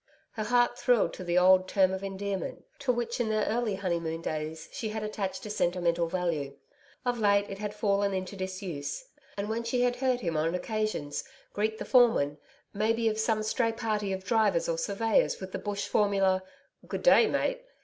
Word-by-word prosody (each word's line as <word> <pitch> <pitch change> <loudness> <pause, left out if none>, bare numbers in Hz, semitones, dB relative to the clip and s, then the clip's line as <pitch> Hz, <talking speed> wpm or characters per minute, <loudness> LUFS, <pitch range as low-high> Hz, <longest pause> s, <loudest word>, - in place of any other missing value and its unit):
Her 215 -2 -4
heart 240 +1 +2
thrilled 245 -3 +3
to 185 - -7
the 175 0 0
old 185 +1 +6
term 190 -1 +3
of 190 +1 -4
endearment, 195 0 -4
to 275 -3 +1
which 240 0 -2
in 235 -2 0
their 215 0 +1
early 225 -2 0
honeymoon 170 -4 -2
days 155 0 -4
she 220 - -4
had 215 0 -4
attached 210 -2 -4
a - - -5
sentimental 175 -3 +1
value. 165 -6 -2 0.5
Of 245 -1 0
late 205 -1 +3
it 195 - -6
had 210 0 -4
fallen 200 -1 +1
into 190 +1 -3
disuse, 185 - -5 0.3
and 200 +1 -2
when 225 +2 -2
she 245 +2 0
had 245 0 +1
heard 255 -1 +1
him 170 -6 -2
on 160 +3 +1
occasions 215 -8 -2 0.3
greet 220 +1 -1
the - - -5
foreman, 225 - +4 0.3
may 215 +2 +2
be 225 0 +1
of 215 0 -3
some 220 -1 +1
stray 230 +1 +1
party 215 -3 -1
of 190 0 -3
drivers 215 -5 +2
or 165 -1 -1
surveyors 210 +5 +1
with 190 0 -7
the - - -4
bush 205 -1 -3
formula: 195 -2 +2 0.5
'Good - - -4
day, 480 -2 +7
mate!' - - 0
205 Hz, 190 wpm, -29 LUFS, 185-225 Hz, 0.5 s, day